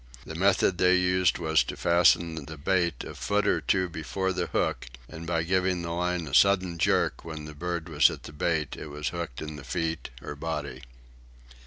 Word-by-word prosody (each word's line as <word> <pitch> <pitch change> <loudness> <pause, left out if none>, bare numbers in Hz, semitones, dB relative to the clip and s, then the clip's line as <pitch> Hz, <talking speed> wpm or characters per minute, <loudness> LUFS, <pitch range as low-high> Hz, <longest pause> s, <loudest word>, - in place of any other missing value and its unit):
The - - -7
method 95 +1 +2
they 90 0 +5
used 90 0 +2
was 80 -2 +2
to - - -6
fasten 85 -2 +3
the 80 +1 -9
bait 85 -2 0
a - - -8
foot - - 0
or - - +2
two 95 -1 +1
before 90 +4 -3
the 90 -1 -2
hook - - -1 0.2
and, 80 +1 -9
by 85 -1 0
giving 90 0 0
the 85 - -4
line 90 0 -1
a 65 - -9
sudden 95 -1 +4
jerk - - +1
when 80 -2 -7
the 75 - -8
bird 85 +2 -4
was 75 -3 +5
at - - -8
the 75 - -10
bait, 80 -1 -1
it - - -8
was 75 0 -4
hooked 85 -7 -5
in 75 -1 -7
the 70 - -10
feet 80 +2 -3
or 75 - -7
body. 70 -4 -4
85 Hz, 200 wpm, -27 LUFS, 75-90 Hz, 0.2 s, they